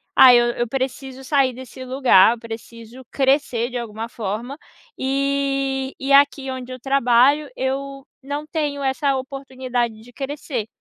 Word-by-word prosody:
ah, 255 -1 +9
eu 240 0 +5
eu 240 0 -1
preciso 265 +1 -4
sair 265 -2 +2
desse 260 +1 -10
lugar, 255 -5 +5
eu 240 - -9
preciso 230 +2 -10
crescer 265 -4 +1
de 250 - -3
alguma 225 -1 -5
forma, 230 +5 -5 0.4
e 275 0 -1
e 270 +1 -3
aqui 280 -1 +4
onde 255 -1 -7
eu 255 - -7
trabalho 270 +2 +3
eu 275 +1 -3 0.2
não 285 +2 -5
tenho 295 -2 -3
essa 275 +1 +1
oportunidade 260 -4 -4
de 245 +2 -16
crescer. 270 -4 -4
265 Hz, 145 wpm, -21 LUFS, 240-275 Hz, 0.4 s, ah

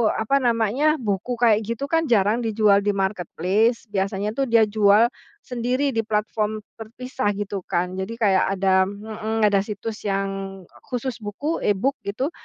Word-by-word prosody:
apa 220 +6 +1
namanya, 245 +5 +2
buku 205 +2 -2
kayak 230 -3 +4
gitu 235 +5 -3
kan 325 0 +2
jarang 215 -1 +3
dijual 210 -2 +4
di 205 - +2
marketplace, 195 +4 0
biasanya 195 +1 -1
tuh 275 - +2
dia 230 -1 +5
jual 210 +2 +4 0.3
sendiri 250 +3 -1
di 225 -3 -2
platform 215 0 -1 0.2
terpisah, 230 +1 -4
gitu 205 0 -3
kan. 180 +1 -1
Jadi 190 +5 -4
kayak 195 -3 +2
ada 190 -1 +3
hmm, 220 +2 -4
ada 205 -1 +4
situs 210 +2 -5
yang 195 -1 -3 0.2
khusus 250 -1 -3
buku 230 +10 -3
e-book 230 +7 0
gitu, 255 +10 -2
215 Hz, 150 wpm, -23 LUFS, 195-235 Hz, 0.3 s, dia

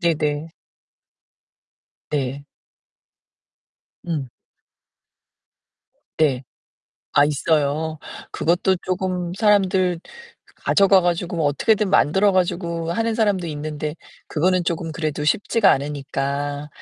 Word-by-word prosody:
네네. 155 -2 0 1.6
네. 140 -1 -2 1.6
음. 150 -6 -2 1.9
네. 135 -5 +1 0.7
아 145 - +5
있어요? 150 +1 0 0.3
그것도 180 +3 +1
쪼금 180 -1 -2
사람들 190 -4 +2 0.6
가져가 195 -1 +4
가지고 175 0 -1
뭐 155 - +2
어떻게든 205 +7 +2
만들어 190 +6 +4
가지고 170 -2 -1
하는 225 +4 0
사람도 205 -6 +1
있는데 150 0 -4 0.3
그거는 180 +3 +1
쪼금 165 -1 -2
그래도 155 -1 -3
쉽지가 205 +6 +3
않으니까 145 +1 -3
165 Hz, 205 characters per minute, -22 LUFS, 150-185 Hz, 1.9 s, 아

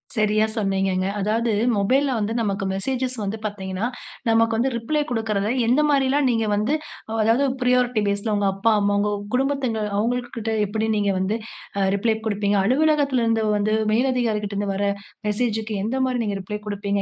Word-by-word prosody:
சரியா 215 0 +3
சொன்னீங்கங்க. 195 -3 0
அதாவது, 225 +3 0 0.3
மொபைல்ல 265 +8 +2
வந்து, 210 +1 -1
நமக்கு 200 -3 -1
மெசேஜஸ் 255 +5 -2
வந்து 205 +3 -3
பாத்தீங்கனா, 195 0 -3 0.4
நமக்கு 225 0 +3
வந்து 250 +4 +2
ரிப்ளே 300 +7 -1
குடுக்குறத, 215 -3 -1 0.2
எந்த 255 +6 +4
மாரிலாம் 275 0 +3
நீங்க 225 -1 +1
வந்து, 215 +8 0 0.5
அதாவது 230 +6 +3 0.2
பிரையாரிட்டி 250 -2 +2
பேஸ்ல. 200 +2 -1
உங்க 200 -1 +1
அப்பா, 210 +4 +2
அம்மா, 205 0 +1
உங்க 210 0 +1 0.2
குடும்பத்தங்க 265 -4 0 0.2
அவங்கள்கிட்ட 235 0 -2
எப்படி, 220 +2 -2
நீங்க 200 -1 +1
வந்து, 200 +4 0 0.4
அ, - - +1
ரிப்ளே 220 +2 +1
குடுப்பீங்க. 205 -1 +1
அலுவலகத்தில 280 0 +2
இருந்து 225 -1 +1
வந்து, 215 +1 +1 0.2
மேல் 245 +5 +2
அதிகாரிகிட்ட 215 -4 -1
இருந்து 200 0 -1
வர்ற, 200 +1 0 0.4
மெசேஜ்க்கு 220 0 -1
எந்த 255 +4 -1
மாரி, 255 -1 -1
நீங்க 200 -1 -2
ரிப்ளே 210 +3 -5
குடுப்பீங்க. 200 -1 -1
220 Hz, 160 wpm, -23 LUFS, 205-245 Hz, 0.5 s, எந்த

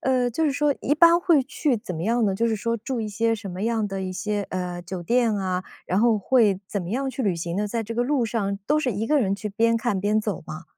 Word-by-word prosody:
呃， 255 -2 +1
就 320 +8 0
是 295 - +2
说 290 +1 +1
一 290 - +2
般 335 +2 +6
会 335 -6 +3
去 280 0 0
怎 185 - -6
么 160 - -4
样 230 +5 +1
呢？ 195 - +1
就 230 +4 +1
是 225 - +1
说 230 +2 -1
住 235 +2 -4
一 215 - -3
些 225 +2 +1
什 205 -3 -7
么 180 +2 -5
样 225 -2 0
的 195 -1 -4
一 185 0 -4
些， 205 +2 -2
呃， 180 -1 -4
酒 180 0 -6
店 235 +4 +2
啊， 185 -2 -2 0.2
然 185 - +1
后 225 0 +4
会 205 -3 +3
怎 200 - -2
么 175 - -6
样 265 +5 -1
去 265 0 -4
旅 200 -6 +1
行 170 +1 -4
呢？ 210 +1 0
在 230 +2 -2
这 225 +1 -6
个 240 - +1
路 255 -2 +1
上 200 -3 -2
都 300 +1 +3
是 255 -6 0
一 210 +3 -2
个 300 +3 +3
人 200 -7 +1
去 210 +1 -5
边 230 +3 +2
看 230 -3 0
边 210 +3 +1
走 210 -5 -3
吗？ 155 +2 -7
220 Hz, 300 characters per minute, -24 LUFS, 195-245 Hz, 0.2 s, 般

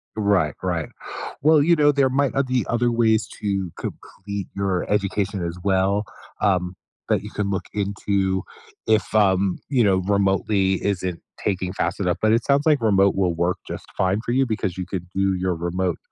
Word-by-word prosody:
Right, 100 -7 +2
right. 85 -4 -1 0.5
Well, 155 +1 +5
you 170 +3 +4
know, 145 -2 +5
there 140 -2 +2
might, 140 +1 +1
uh, 140 - +3
be 130 -2 0
other 120 0 +1
ways 110 -2 +2
to 95 -4 -1
complete 100 -1 -6
your 95 -2 -1
education 100 -2 0
as 85 +1 -4
well, 100 +1 +2 0.4
um, 90 -3 +1 0.3
that - - +2
you - - -7
can 100 -1 -2
look 95 -1 -2
into 100 -1 -1 0.4
if, 110 -1 +2
um, 95 -2 +3
you 130 -4 +3
know, 100 -3 +4
remotely 95 0 +1
isn't 90 -3 -2 0.2
taking 95 -2 -1
fast - - -2
enough. 90 -3 0
But 110 0 +4
it 115 +1 +2
sounds 140 +2 +2
like 150 -5 +4
remote 100 -3 +3
will 95 -3 +1
work 85 +2 0
just - - -6
fine 95 +2 +1
for 120 - -3
you, 135 +2 +3
because 105 -5 -2
you 95 - -3
could 90 -1 -5
do 95 0 +1
your 90 -1 -1
remote 85 +1 -1
100 Hz, 180 wpm, -23 LUFS, 95-110 Hz, 0.5 s, Well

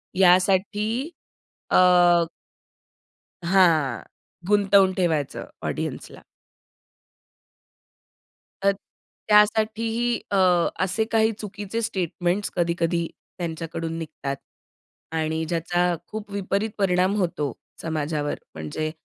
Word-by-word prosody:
यासाठी 190 +3 +3 0.8
अ - - +3 1.8
हां, 160 - +3 0.4
गुंतवून 200 -2 +4
ठेवायचं 160 -6 0 0.2
ऑडियन्सला. - - -5 2.4
तर 200 0 +4 0.6
त्यासाठीही 220 +3 +3 0.2
अ, 200 - +2 0.5
असे 190 +4 0
काही 220 0 +3
चुकीचे 205 +2 -4
स्टेटमेंट्स 185 -1 -1
कधी-कधी 170 -1 0 0.3
त्यांच्याकडून 165 -1 -4
निघतात 155 -4 -5 0.8
आणि 160 0 -1
ज्याचा 175 +2 0
खूप 215 -1 -7
विपरीत 200 +2 -1
परिणाम 185 0 +2
होतो 165 -8 -1 0.3
समाजावर. 155 -2 -2 0.2
म्हणजे 115 - -4
185 Hz, 75 wpm, -24 LUFS, 165-205 Hz, 2.4 s, गुंतवून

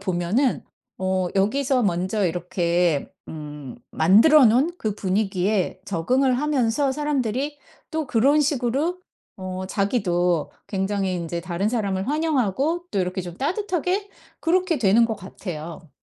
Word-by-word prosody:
보면은 195 +7 0 0.4
어 185 -1 0
여기서 250 +6 +2
먼저 190 +1 0
이렇게 175 -2 0 0.2
음 150 -4 -8
만들어 225 - +6
놓은 255 +9 +4
그 215 - -2
분위기에 195 -1 0
적응을 250 +9 +1
하면서 275 -2 +1
사람들이 285 -1 -2 0.3
또 315 -2 -2
그런 270 +6 +3
식으로 285 +6 0 0.4
어 185 0 -5
자기도 180 - 0 0.2
굉장히 195 -1 -1
인제 170 -1 -3
다른 185 +4 -2
사람을 200 -5 -1
환영하고 300 - 0
또 200 - -1
이렇게 180 0 -2
좀 175 0 -8
따뜻하게 370 +4 -1 0.3
그렇게 355 -1 +1
되는 230 +1 +4
것 225 - -2
같아요. 170 -4 -8
205 Hz, 280 characters per minute, -23 LUFS, 180-275 Hz, 0.4 s, 만들어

